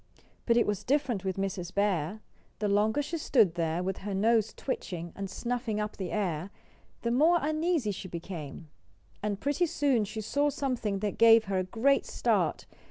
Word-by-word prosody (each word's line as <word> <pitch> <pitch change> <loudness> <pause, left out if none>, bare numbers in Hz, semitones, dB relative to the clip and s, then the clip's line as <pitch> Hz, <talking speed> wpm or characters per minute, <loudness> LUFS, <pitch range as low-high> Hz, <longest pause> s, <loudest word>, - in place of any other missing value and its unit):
But 235 -1 +4
it 235 - +4
was 205 -2 -2
different 255 -7 0
with 190 -1 -2
Mrs. 190 -3 -3
Bear. 200 -1 0 0.4
The 210 - -1
longer 210 +7 +2
she 330 +3 -4
stood 225 - +3
there, 165 +1 -1
with 190 +1 -3
her 200 0 -4
nose 220 +2 +3
twitching, 175 -10 -5
and 195 -1 -5
snuffing 240 -1 -2
up 210 0 -3
the 185 -3 -4
air, 185 -4 -1 0.5
the 235 - 0
more 315 +8 +5
uneasy 310 -5 0
she 190 -1 -6
became. 170 -3 -7 0.5
And 205 -1 -2
pretty 290 +5 +1
soon 275 -8 +1
she 220 +2 -5
saw 285 +7 +1
something 250 -8 -2
that 210 -2 -2
gave 230 0 +7
her 195 -2 -1
a - - 0
great 235 +9 +1
start. - - 0
210 Hz, 175 wpm, -29 LUFS, 190-250 Hz, 0.5 s, gave